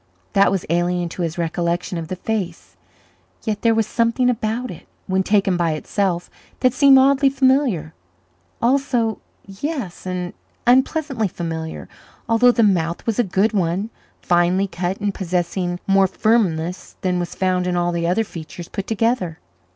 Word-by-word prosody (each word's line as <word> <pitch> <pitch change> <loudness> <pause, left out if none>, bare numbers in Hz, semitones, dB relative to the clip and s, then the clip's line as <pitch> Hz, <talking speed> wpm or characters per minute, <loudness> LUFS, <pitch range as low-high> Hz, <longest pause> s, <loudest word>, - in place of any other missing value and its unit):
That 200 - +5
was 195 -2 -1
alien 175 +1 0
to 180 - -6
his 165 -1 -2
recollection 170 +2 -1
of 160 - -6
the 185 - -4
face, 185 -3 -4 0.7
yet 215 -2 -2
there 230 -1 +3
was 225 -1 +2
something 235 +3 +2
about 235 +2 -2
it, 175 - -11 0.2
when 190 0 +1
taken 195 -1 +2
by 170 -2 +1
itself, 175 +2 -1 0.3
that 255 -2 +3
seemed 270 0 +6
oddly 275 +1 +5
familiar 260 - +1 0.7
also 245 -3 +1 0.3
yes, 200 - -5
and 180 -1 -3 0.3
unpleasantly 260 -1 +2
familiar, 165 -2 -5 0.4
although 235 +2 +5
the 235 -1 +2
mouth 170 -5 +1
was 225 0 -1
a - - +5
good 195 +3 +1
one 190 +3 0 0.3
finely 175 +2 +3
cut 180 0 -3
and 205 -1 -1
possessing 180 -1 -2
more 195 0 +4
firmness 185 -5 0
than 180 -1 0
was 175 - -4
found 185 -1 0
in 180 - 0
all 175 0 +1
the 170 -1 -1
other 185 +6 +2
features 170 -2 -9
put 195 - -5
together. 225 -6 0
190 Hz, 155 wpm, -21 LUFS, 175-230 Hz, 0.7 s, seemed